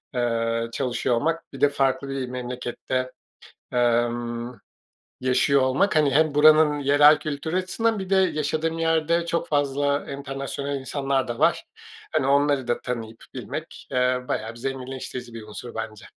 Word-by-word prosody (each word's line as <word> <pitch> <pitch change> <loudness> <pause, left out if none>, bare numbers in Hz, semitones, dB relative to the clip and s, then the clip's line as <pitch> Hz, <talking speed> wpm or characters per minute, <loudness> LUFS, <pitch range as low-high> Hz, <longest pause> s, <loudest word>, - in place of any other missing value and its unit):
eee, 115 -1 0
çalışıyor 120 0 0
olmak, 165 +6 -2
bir 135 - -9
de 145 - +6
farklı 140 0 0
bir 135 -2 -3
memlekette, 125 +1 -4 0.6
emm, 120 0 0 0.7
yaşıyor 130 +2 +3
olmak, 130 +10 +2
hani, 150 -3 +4
hem 155 +1 +3
buranın 155 0 +6
yerel 145 +2 +6
kültürü 155 +2 -4
açısından, 220 +4 0
bir 190 -1 -6
de 195 - +3
yaşadığım 160 -3 0
yerde 165 +1 +1
çok 170 0 -1
fazla 145 0 0
enternasyonal 140 0 -4
insanlar 135 0 -1
da 120 -1 -5
var. - - +2 0.5
Hani, 130 - +1
onları 140 -2 +2
da 120 - 0
tanıyıp 115 -2 -5
bilmek, - - -7
eee, 125 0 +2
bayağı 110 - -2
bir 120 - -13
zenginleştirici 130 -1 -5
bir 115 -1 -8
unsur 110 +3 -9
bence. 110 -2 -6
135 Hz, 145 wpm, -24 LUFS, 125-150 Hz, 0.7 s, de